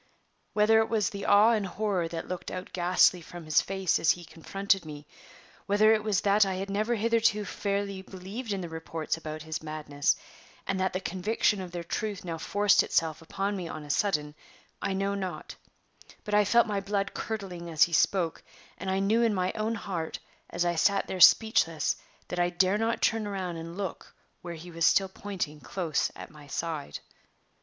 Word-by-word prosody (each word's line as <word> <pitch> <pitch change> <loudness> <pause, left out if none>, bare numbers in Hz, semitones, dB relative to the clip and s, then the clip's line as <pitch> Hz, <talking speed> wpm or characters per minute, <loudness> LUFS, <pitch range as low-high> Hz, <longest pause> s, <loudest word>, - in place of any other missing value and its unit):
Whether 215 +1 +5
it 220 - +1
was 215 -4 +1
the 200 0 -6
awe 210 +3 +6
and 210 -4 +1
horror 190 -3 -1
that 165 0 -6
looked 180 -1 -5
out 185 0 -7
ghastly 180 0 +4
from 170 0 -10
his 155 0 +4
face 190 -2 0
as 160 - +2
he 175 +2 +2
confronted 195 +4 -1
me, 150 -2 -9 0.6
whether 215 +2 +5
it 215 -1 +1
was 205 -3 +1
that 205 +1 +4
I 190 -1 -1
had 195 +1 -4
never 215 +4 0
hitherto 225 -1 +2
fairly 200 -1 -2
believed 195 +5 -7
in 195 -1 -1
the 175 - -5
reports 160 -1 -3
about 155 -1 -7
his 160 0 -4
madness, 150 -2 -1 0.5
and 195 -1 -1
that 190 0 0
the 185 - -1
conviction 195 +3 0
of 185 - -6
their 175 -1 -5
truth 200 +3 -4
now 165 -2 -4
forced 205 +3 +3
itself 160 -1 0
upon 195 +5 -2
me 180 -3 -4
on 155 -2 -7
a 145 - -4
sudden, 150 -5 0 0.5
I 195 - -1
know 195 +1 0
not, 190 -3 -5 0.7
but 210 - -5
I 210 0 +5
felt 235 +4 +5
my 205 -3 -1
blood 200 0 -2
curdling 190 -6 -5
as 155 -2 +4
he 170 - +1
spoke, 170 0 +2 0.4
and 190 - -4
I 190 - +1
knew 205 +4 +2
in 230 -3 +2
my 185 0 0
own 220 +1 -1
heart, 175 -6 -4 0.3
as 175 +1 -1
I 175 - +2
sat 195 +4 +2
there 185 - -5
speechless, 165 -5 +5 0.3
that 180 - -3
I 175 0 +3
dare 185 +3 +2
not 225 +1 0
turn 225 -2 +2
round 185 -4 -4
and 165 +2 -8
look 195 -4 -6 0.3
where 170 -1 -6
he 170 +2 -10
was 165 -1 +2
still 195 -1 +3
pointing 185 -6 -5
close 155 +4 -1
at - - -9
my 150 -1 -14
side. 150 - -4
190 Hz, 195 wpm, -28 LUFS, 165-205 Hz, 0.7 s, awe